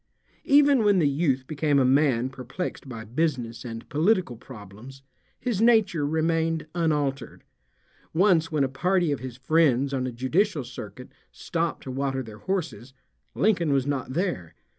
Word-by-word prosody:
Even 280 -3 +5
when 205 -2 +4
the 160 -5 +3
youth 140 -2 0
became 145 0 0
a 135 - +4
man 130 -2 +3
perplexed 135 +3 -6
by 115 -3 -7
business 125 -2 -2
and 115 -2 -7
political 170 - +1
problems 120 +3 -12 0.4
his 230 -5 -2
nature 210 -10 +3
remained 160 +1 0
unaltered. 150 -5 -1 0.7
Once 165 -2 +3
when 150 -3 +1
a - - +2
party 175 +5 +1
of 145 - -1
his 125 -1 -8
friends 140 -1 +2
on 130 -1 -1
a - - -4
judicial 150 - 0
circuit 120 -1 -9 0.2
stopped 170 -1 -3
to 130 - -6
water 135 0 -2
their 110 -2 -11
horses, 150 - -4 0.4
Lincoln 185 -7 +2
was 135 -2 +2
not 135 -3 -3
there. 170 - -2
145 Hz, 150 wpm, -25 LUFS, 130-170 Hz, 0.7 s, Even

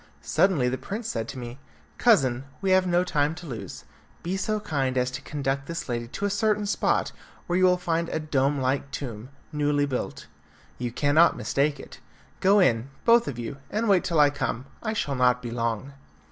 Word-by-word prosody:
Suddenly 170 -10 +2
the 130 0 -1
prince 210 - -5
said 115 - -3
to 135 - -7
me, 120 +1 -7 0.4
"Cousin, 135 - +3
we 195 -2 0
have 185 0 +4
no 175 0 +3
time 150 -3 0
to 175 - -10
lose; 125 -8 -7 0.4
be 180 +3 -2
so 215 +2 -1
kind 135 -9 -1
as 125 0 +1
to 130 - -6
conduct 140 -1 -3
this 165 -1 -4
lady 120 -2 -3
to 200 +11 -4
a - - +1
certain 210 0 +1
spot, 200 - +1 0.3
where 175 - -1
you 185 - +5
will 180 0 +4
find 170 -1 -1
a - - -2
dome 145 -2 +1
like 135 +2 0
tomb, 125 -4 -6 0.2
newly 145 -1 +1
built. 130 -3 -4 0.5
You 120 -1 -2
cannot 145 +6 +4
mistake 145 0 0
it. - - -11 0.4
Go 200 +2 +5
in, 120 - +2 0.2
both 235 0 +5
of 125 - -4
you, 120 +4 -5
and 220 +2 -1
wait 195 -3 +4
till 165 -3 0
I 145 -1 +6
come. 135 -3 -3 0.2
I 220 -1 -2
shall 145 -9 -1
not 125 -2 +3
be 120 -1 -6
long." 115 +3 -2
145 Hz, 200 wpm, -26 LUFS, 130-180 Hz, 0.5 s, I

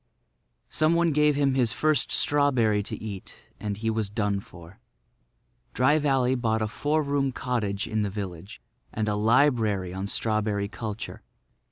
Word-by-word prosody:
Some 155 +2 +3
one 170 -1 +3
gave 150 0 +3
him 140 -1 +2
his 125 -4 +2
first 155 -1 +1
strawberry 130 -8 +2
to 100 - -5
eat, 100 -3 -8 0.2
and 105 -2 -3
he 110 +1 -1
was 110 -2 -1
done 105 -1 -1
for. 85 +1 -14 1.0
Dry 145 +5 +4
Valley 135 -3 +2
bought 110 -3 0
a - - 0
four 150 +8 0
room 140 -1 0
cottage 110 -6 -2
in 110 -1 -1
the 105 - 0
village, 95 -2 -7 0.3
and 110 -1 -2
a 105 - +1
library 110 -4 +2
on 95 +1 -4
strawberry 105 -1 0
culture. 105 +2 -6
110 Hz, 155 wpm, -26 LUFS, 105-135 Hz, 1.0 s, Dry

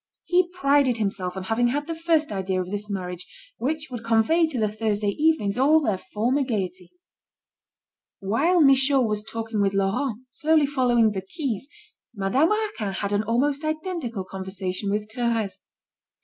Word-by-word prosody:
He 355 0 +2
prided 280 -8 +2
himself 195 -3 -2
on 190 - -4
having 225 +5 +1
had 290 +4 -1
the 330 - -3
first 325 -3 +1
idea 190 -2 -1
of 185 0 -4
this 205 +1 -4
marriage 180 -2 -5 0.3
which 305 +3 -2
would 240 -2 -6
convey 230 +9 +3
to 275 -6 -3
the 215 - +2
Thursday 210 -1 -1
evenings 250 -4 +1
all 300 +4 +5
their 215 -11 -1
former 235 +9 -1
gaiety. 185 -7 -4 1.3
While 285 - +2
Michaud 270 -1 +5
was 210 -2 -1
talking 225 -1 -3
with 195 0 +1
Laurent, 225 +5 -1
slowly 310 +1 +3
following 245 -5 +2
the 195 -2 -3
quays, 260 - -4 0.5
Madame 210 - +2
Raquin 425 - -1
had 200 +1 -2
an 205 - +2
almost 270 +7 0
identical 310 - -3
conversation 190 +1 -4
with 210 +1 -1
Thérèse. 230 -4 -1
230 Hz, 155 wpm, -24 LUFS, 200-290 Hz, 1.3 s, all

